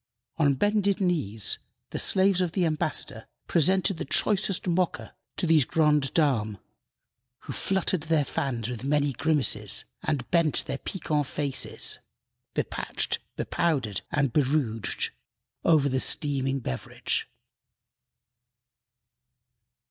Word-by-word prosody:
On 145 -4 +3
bended 200 +4 +1
knees 145 - -1 0.3
the - - -3
slaves 190 -1 +3
of 175 -2 -1
the 185 -3 +1
ambassador 150 -6 -2 0.2
presented 185 +2 +2
the - - -3
choicest 195 +5 +1
Mocha 180 0 -1 0.2
to - - -1
these 160 -3 +5
grande 150 -1 +2
dames, 115 -10 +1 0.8
who - - -7
fluttered 190 -2 0
their 155 -3 +3
fans 120 -6 -2
with 125 -1 -5
many 145 0 +1
grimaces 130 - +2 0.2
and 150 -7 -2
bent 170 -4 +3
their 135 - -4
piquant 150 -6 -2
faces 140 -1 +1 0.6
bepatched, - - -2 0.2
bepowdered, 130 - -1
and 140 -5 +1
berouged 130 -6 0 0.5
over 155 -4 +4
the 130 -1 0
steaming 135 -2 0
beverage. 65 - -3
150 Hz, 110 wpm, -27 LUFS, 130-170 Hz, 0.8 s, these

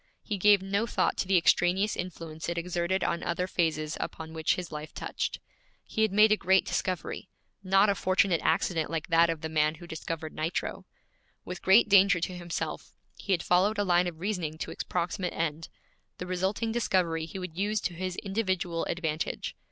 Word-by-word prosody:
He 205 -3 -3
gave 205 0 +5
no 200 +4 0
thought - - +1
to - - -1
the 190 -1 +4
extraneous 180 +4 +3
influence 165 -3 -6
it 170 - -3
exerted 175 +2 -1
on 170 - 0
other 175 +1 -1
phases 155 -4 -1
upon 160 0 -6
which 160 -1 +1
his 180 -3 -6
life 150 +1 -7
touched. - - -3 0.5
He 220 - -3
had 220 -2 +3
made 210 +2 +6
a - - +6
great 190 0 +3
discovery 185 0 -3 0.3
not 195 +2 +4
a 200 - +3
fortunate 185 -2 +2
accident 165 -4 +1
like 165 0 -3
that 165 0 +5
of 165 -2 -2
the 160 - -3
man 155 0 +1
who 175 +2 -12
discovered 160 -1 -5
nitro. 160 +3 -3 0.6
With 180 0 -6
great 195 +5 +6
danger 200 -2 +6
to 180 +2 -3
himself, 175 -1 -5 0.2
he 200 - -6
had 175 -3 +2
followed 195 +4 +3
a 205 - +2
line 180 -2 +3
of 165 -2 -6
reasoning 175 -5 -2
to - - -5
its - - -5
proximate 180 +1 -2
end; 160 -1 -3 0.5
the 180 - -5
resulting 190 +5 -1
discovery 180 -8 0
he 180 - -8
would 180 -3 -6
use 205 +3 0
to 180 - -2
his 185 +1 -4
individual 190 -5 -1
advantage. 160 -3 -3
180 Hz, 190 wpm, -29 LUFS, 165-195 Hz, 0.6 s, made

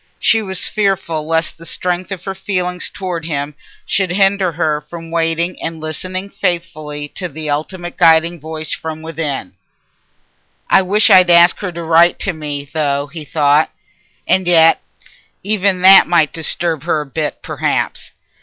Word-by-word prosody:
She 225 - +3
was 190 -4 -2
fearful 190 -7 -1
lest 165 0 -1
the 165 - -11
strength 180 +1 -2
of 185 -2 -5
her 195 - -3
feeling 185 -2 -3
towards 175 -4 -5
him 145 -2 -3 0.3
should 190 -1 0
hinder 195 -1 +2
her 155 -2 -1
from 165 +2 -10
waiting 165 +1 -1
and 165 0 -4
listening 185 +5 -5
faithfully 155 -5 -4
for 180 - -3
the 155 -1 -5
ultimate 175 +4 -4
guiding 165 0 +4
voice 155 +1 -5
from 160 0 -6
within. 155 - -4 1.2
"I - - +6
wish 200 +3 +3
I'd 185 -1 +7
asked 170 0 +5
her 190 -3 -3
to 170 0 -6
write 165 +1 +4
to 195 - -1
me, 145 -3 -5
though," 145 -1 -2
he 160 -3 -6
thought. 150 0 +2 0.6
"And 185 -1 +2
yet 165 -2 +5 0.6
even 200 -2 +1
that 190 +1 +8
might 165 -4 +2
disturb 165 -1 -1
her 160 -3 0
a - - -7
bit, 150 +2 -4
perhaps. - - -2
165 Hz, 155 wpm, -16 LUFS, 155-185 Hz, 1.2 s, that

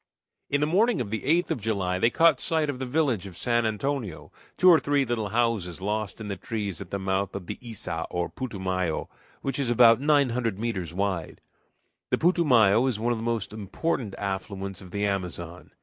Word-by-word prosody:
In 140 0 +1
the - - +4
morning 210 +9 +2
of 105 -5 -3
the 110 - -2
8th 170 +6 +2
of 120 - -1
July 95 -4 -1
they 115 - +4
caught 165 0 +4
sight 155 -3 +1
of 130 - -9
the 130 - -3
village 125 - 0
of 90 -3 -11
San 120 -1 +1
Antonio, 110 - -3 0.3
two 185 - +4
or 170 -3 +8
three 140 0 +1
little 115 -4 -2
houses 110 -6 0
lost 105 +2 -3
in 110 - -6
the 100 - -3
trees 100 -7 -4
at - - -8
the 100 - -2
mouth 95 0 -1
of 100 -2 -5
the - - -5
Iça, 105 -8 -4
or 90 0 -1
Putumayo, 95 -9 -3 0.3
which 135 +1 -2
is 135 -4 0
about 120 0 +6
nine 145 -2 +4
hundred 115 -4 -1
meters 100 -7 -3
wide. 95 -3 -2 0.7
The - - +2
Putumayo 130 - +4
is 120 -5 -1
one 120 +2 0
of 115 - -4
the - - -5
most 115 -3 -2
important 110 - -3
affluents 95 0 -4
of 95 - -11
the 100 +3 -1
Amazon. 90 -3 -4
110 Hz, 200 wpm, -26 LUFS, 95-130 Hz, 0.7 s, or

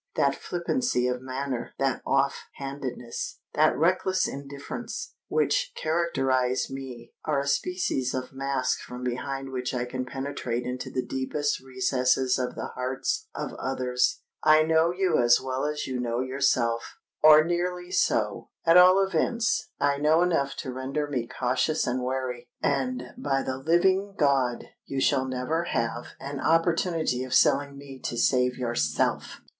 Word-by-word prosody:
That 140 -1 +3
flippancy 175 - -1
of 125 0 -2
manner—that 130 0 -2
off 135 0 +1
handedness—that 135 -4 -2
reckless 185 +4 +2
indifference, 140 - -6
which - - +1
characterise 135 -7 0
me, 130 -3 -8
are 150 -3 +1
a 140 - -5
species 140 -4 0
of 130 0 -4
mask 135 -1 -1
from 125 0 -8
behind 135 +2 -3
which 125 0 -3
I 120 0 -1
can 130 +1 -4
penetrate 130 -2 -3
into 125 +1 -4
the 130 - -2
deepest 145 +2 -1
recesses 130 0 +1
of 125 - -2
the - - -5
hearts 130 - -2
of - - -4
others. 125 -1 0 0.2
I 155 0 +6
know 160 +1 +3
you 180 -3 +1
as 120 0 +5
well 130 +1 -2
as 150 0 -2
you 130 -1 -3
know 120 -1 -1
yourself—or 130 +3 +3
nearly 175 +1 -2
so. 105 - 0 0.2
At 165 +1 +7
all 185 +2 +7
events, 225 +2 0
I 140 0 +2
know 155 +3 +4
enough 165 -6 +1
to 130 - -5
render 135 +3 -2
me 130 -5 -3
cautious 130 +7 0
and 125 +1 -1
wary; 125 -1 -3
and, 125 -2 -1
by 135 -2 0
the 130 0 -3
living 190 +6 +2
God! 135 -5 +2 0.2
you 135 - -2
shall 135 -1 +2
never 130 +6 -1
have 115 -4 -2
an 140 +1 -5
opportunity 165 -4 +1
of 130 - -2
selling 140 0 +3
me 140 -1 -10
to 120 - -4
save 125 +1 +2
yourself!" 120 - -1
135 Hz, 145 wpm, -27 LUFS, 125-155 Hz, 0.2 s, At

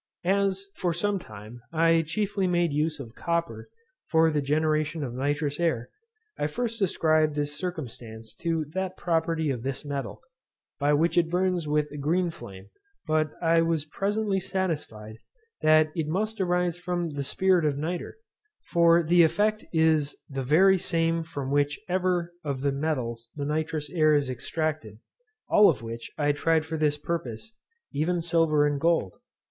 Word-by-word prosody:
As, 195 +1 +1
for 175 -3 -1
some 205 +2 0
time, 110 - -11
I 165 0 +4
chiefly 195 +4 -1
made 175 -3 +1
use 155 +1 0
of 115 -5 -8
copper 170 - -3 0.4
for 160 0 +4
the 150 -1 0
generation 155 +2 0
of 125 -4 -4
nitrous 145 +3 -1
air, 160 -9 0 0.5
I 145 - +1
first 230 +7 -3
ascribed 155 -4 +2
this 145 0 -2
circumstance 120 - -6
to 165 -2 -1
that 190 0 -3
property 165 -2 0
of 125 -4 -4
this 135 +3 -4
metal, 140 -1 -4 0.6
by 145 +1 +2
which 165 +4 +3
it 165 -1 0
burns 180 -2 0
with 150 0 0
a 150 - -7
green 170 +5 +1
flame; 95 -8 -11 0.3
but 155 -1 +1
I 165 0 +4
was 165 -2 0
presently 200 +4 -1
satisfied 150 - -4 0.4
that 155 0 +5
it 160 -3 -2
must 210 +6 -1
arise 180 -1 0
from 175 -2 -2
the 145 -1 -3
spirit 185 +4 +2
of 145 -2 +1
nitre, 170 +4 -4 0.6
for 170 0 +5
the 170 +2 +5
effect 210 +6 +2
is 160 -3 +2
the 135 -1 -4
very 185 +8 +4
same 165 0 0
from 145 -4 -5
which 145 0 +1
ever 180 -1 0
of 140 -3 -3
the 140 0 +1
metals 125 -6 -3
the 145 -1 -3
nitrous 155 0 -2
air 155 -3 +4
is 140 -3 +1
extracted, 145 -3 -3 0.5
all 210 -1 +6
of 140 -8 -1
which 115 0 -6
I 145 -1 +2
tried 160 +2 +1
for 160 0 -4
this 150 -2 +1
purpose, 155 - -5 0.4
even 170 +4 0
silver 165 -3 +3
and 145 -1 0
gold. 165 - +1
160 Hz, 160 wpm, -27 LUFS, 145-175 Hz, 0.6 s, all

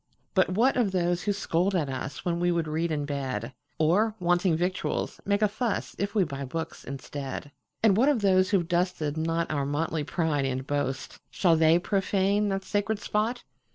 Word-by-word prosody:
"But 185 -2 +3
what 235 +9 +2
of 230 -6 +2
those 175 -1 +1
who 205 - 0
scold 195 -1 0
at 160 -5 +1
usWhen 135 +6 -3
we 175 0 +2
would 170 -2 0
read 160 +2 -1
in 145 -2 -1
bed? 130 -5 -3 0.2
Or, 195 +7 +2
wanting 175 -1 +2
victuals, 180 +2 -2
make 200 +1 +1
a - - +6
fussIf 205 -2 -3
we 205 - +4
buy 140 -4 -4
books 160 +5 -5
instead? 140 +1 -6 0.3
And 210 -4 +5
what 255 +7 +4
of 270 -7 +2
those 185 -1 +4
who 200 - +4
've - - -12
dusted 175 -4 0
notOur 160 -2 -1
motley 155 +1 -1
pride 155 -3 0
and 130 0 -2
boast,—Shall 145 +5 -1
they 160 +1 +5
profane 195 +2 +1
that 195 0 -2
sacred 205 +2 -1
spot?" 215 +4 -1
175 Hz, 175 wpm, -27 LUFS, 150-200 Hz, 0.3 s, a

